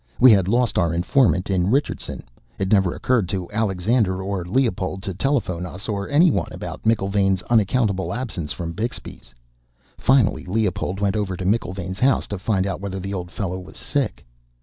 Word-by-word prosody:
We 130 Hz, -1 st, +9 dB
had 95 Hz, -4 st, +4 dB
lost 120 Hz, 0 st, +2 dB
our 85 Hz, -2 st, +1 dB
informant 90 Hz, -, +2 dB
in 90 Hz, 0 st, +1 dB
Richardson; 140 Hz, +6 st, -1 dB, 0.3 s
it 95 Hz, -1 st, -2 dB
never 95 Hz, -4 st, +3 dB
occurred 115 Hz, -8 st, +1 dB
to 90 Hz, 0 st, -3 dB
Alexander 105 Hz, -1 st, +1 dB
or 95 Hz, -2 st, -2 dB
Leopold 95 Hz, -2 st, -1 dB
to 95 Hz, -, -3 dB
telephone 95 Hz, -6 st, -1 dB
us 90 Hz, +3 st, -7 dB
or 100 Hz, -2 st, -3 dB
anyone 155 Hz, +3 st, +3 dB
about -, -, -7 dB
McIlvaine's 95 Hz, -4 st, +1 dB
unaccountable 105 Hz, -3 st, +2 dB
absence 105 Hz, -, -4 dB
from 85 Hz, -2 st, -4 dB
Bixby's. 110 Hz, -, -6 dB, 0.7 s
Finally, 130 Hz, -5 st, +3 dB
Leopold 95 Hz, -1 st, -1 dB
went 100 Hz, -1 st, +1 dB
over 100 Hz, -4 st, -2 dB
to 90 Hz, -, -5 dB
McIlvaine's 95 Hz, -3 st, -1 dB
house 135 Hz, +1 st, +3 dB
to 100 Hz, -, -4 dB
find 95 Hz, -1 st, 0 dB
out 95 Hz, -2 st, -3 dB
whether 95 Hz, -1 st, -4 dB
the 100 Hz, +2 st, -5 dB
old 90 Hz, -2 st, -4 dB
fellow 95 Hz, -1 st, -4 dB
was 90 Hz, -, -12 dB
sick. 135 Hz, +3 st, -2 dB
100 Hz, 170 wpm, -22 LUFS, 95-115 Hz, 0.7 s, We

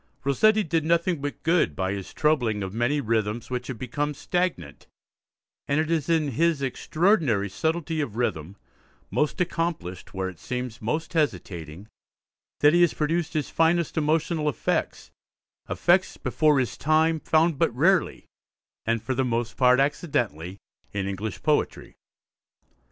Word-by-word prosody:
Rossetti 215 Hz, +11 st, +3 dB
did 160 Hz, -2 st, 0 dB
nothing 170 Hz, 0 st, +1 dB
but 145 Hz, 0 st, -5 dB
good 165 Hz, -, +2 dB
by 95 Hz, +3 st, -1 dB
his 100 Hz, -2 st, -6 dB
troubling 120 Hz, -10 st, +1 dB
of 95 Hz, 0 st, -5 dB
many 120 Hz, +6 st, +1 dB
rhythms 115 Hz, -1 st, -1 dB
which 125 Hz, 0 st, -3 dB
had 130 Hz, -, -5 dB
become 145 Hz, +5 st, -3 dB
stagnant, 170 Hz, -, -3 dB, 0.8 s
and 140 Hz, +2 st, +1 dB
it 160 Hz, +1 st, -1 dB
is 160 Hz, -2 st, 0 dB
in 160 Hz, -3 st, +2 dB
his 165 Hz, +4 st, +1 dB
extraordinary 140 Hz, -, +1 dB
subtlety 160 Hz, -, -1 dB
of 120 Hz, -8 st, -4 dB
rhythm, 95 Hz, -7 st, -2 dB, 0.6 s
most 150 Hz, -, 0 dB
accomplished 165 Hz, -, -3 dB
where 95 Hz, -1 st, -3 dB
it 90 Hz, -4 st, -9 dB
seems 125 Hz, -2 st, -5 dB
most 155 Hz, +11 st, -2 dB
hesitating, 95 Hz, -, -2 dB, 0.7 s
that 145 Hz, +1 st, +6 dB
he 175 Hz, -, +4 dB
has 175 Hz, -, +3 dB
produced 165 Hz, +2 st, -1 dB
his 155 Hz, -3 st, -2 dB
finest 165 Hz, 0 st, +2 dB
emotional 155 Hz, 0 st, +1 dB
effects, 130 Hz, -, -2 dB, 0.6 s
effects -, -, +2 dB
before 150 Hz, -2 st, +2 dB
his 130 Hz, -3 st, -1 dB
time 160 Hz, +2 st, +2 dB
found 160 Hz, -1 st, +2 dB
but 165 Hz, -, +3 dB
rarely, 180 Hz, +7 st, +2 dB, 0.6 s
and 115 Hz, -1 st, 0 dB
for 130 Hz, -, -1 dB
the 130 Hz, +1 st, 0 dB
most 120 Hz, -2 st, -2 dB
part 125 Hz, 0 st, +4 dB
accidentally, 115 Hz, -, -1 dB, 0.4 s
in 100 Hz, -1 st, -2 dB
English 100 Hz, +1 st, -5 dB
poetry. -, -, 0 dB
145 Hz, 145 wpm, -25 LUFS, 110-160 Hz, 0.8 s, that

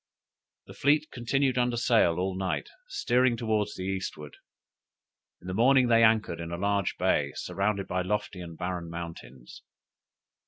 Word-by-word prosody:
The -, -, -12 dB
fleet 150 Hz, +2 st, +2 dB
continued 130 Hz, +1 st, 0 dB
under 120 Hz, -1 st, +1 dB
sail 115 Hz, -8 st, +3 dB
all 95 Hz, +1 st, -1 dB
night, 95 Hz, -1 st, -2 dB, 0.2 s
steering 125 Hz, -, +1 dB
towards 110 Hz, -2 st, -1 dB
the 95 Hz, -, -6 dB
eastward. 95 Hz, -6 st, -5 dB, 1.0 s
In -, -, -18 dB
the 90 Hz, -, -3 dB
morning 125 Hz, +4 st, +4 dB
they 115 Hz, 0 st, +5 dB
anchored 110 Hz, -6 st, +3 dB
in 85 Hz, 0 st, -5 dB
a 85 Hz, -, -3 dB
large 100 Hz, 0 st, 0 dB
bay -, -, +1 dB
surrounded 100 Hz, 0 st, -2 dB
by 90 Hz, 0 st, -1 dB
lofty 100 Hz, -1 st, -3 dB
and 85 Hz, -2 st, -9 dB
barren 90 Hz, -2 st, -4 dB
mountains. 85 Hz, -7 st, -9 dB
100 Hz, 150 wpm, -28 LUFS, 90-120 Hz, 1.0 s, they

